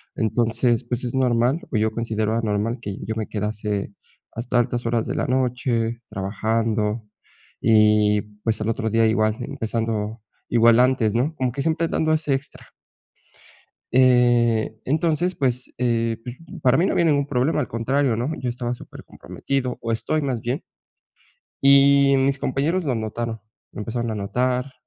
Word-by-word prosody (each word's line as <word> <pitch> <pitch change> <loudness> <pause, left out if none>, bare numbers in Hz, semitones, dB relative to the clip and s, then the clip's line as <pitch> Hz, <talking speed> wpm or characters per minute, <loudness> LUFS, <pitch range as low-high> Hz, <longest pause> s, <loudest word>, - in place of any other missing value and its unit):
Entonces, 115 +2 +1
pues, 120 +1 -3
es 120 - -3
normal 125 +3 +2
o 115 - 0
yo 110 +1 +1
considero 110 -1 -1
normal 110 +3 -1
que 100 -3 -5
yo 110 - -3
me 110 -1 -3
quedase 105 -1 -3 0.4
hasta 120 +2 0
altas 120 0 -1
horas 115 -1 0
de - - -3
la - - 0
noche 125 -2 0
trabajando 110 +2 -1 0.5
y 105 -1 +4 0.2
pues, 110 -1 0
al 110 - -1
otro 110 0 -1
día 115 +1 +3
igual 110 -1 +1
empezando 115 -4 -3 0.3
igual 115 0 +5
antes, 125 -4 +2
¿no?, 135 +7 +1
como 130 -3 -1
que 140 - -3
siempre 165 +2 0
dando 155 -1 0
ese 155 -2 +1
extra. 135 +1 -5 1.3
Eh, 120 -3 +4
entonces 160 +5 +1
pues, 125 -5 -1
eh, 115 -2 0
pues, 125 0 -7 0.3
para 130 +1 +4
mí 175 - +3
no - - 0
había 170 - +2
ningún 145 -3 +2
problema, 145 +3 +1
al 135 - -2
contrario, 125 +2 0
¿no?, 120 +6 -2
yo 130 - -3
estaba 120 0 -3
supercomprometido 130 +1 -5
o 115 - -1
estoy 150 +7 -1
más 130 -5 -2
bien. 125 - -2 1.0
Y 140 0 +6
mis 135 +1 +1
compañeros 150 +8 0
lo 135 -7 -1
notaron, 110 +1 -4 0.3
lo - - -12
empezaron 115 +2 -3
a 110 - -3
notar, 125 +6 -1
120 Hz, 155 wpm, -23 LUFS, 110-130 Hz, 1.3 s, Y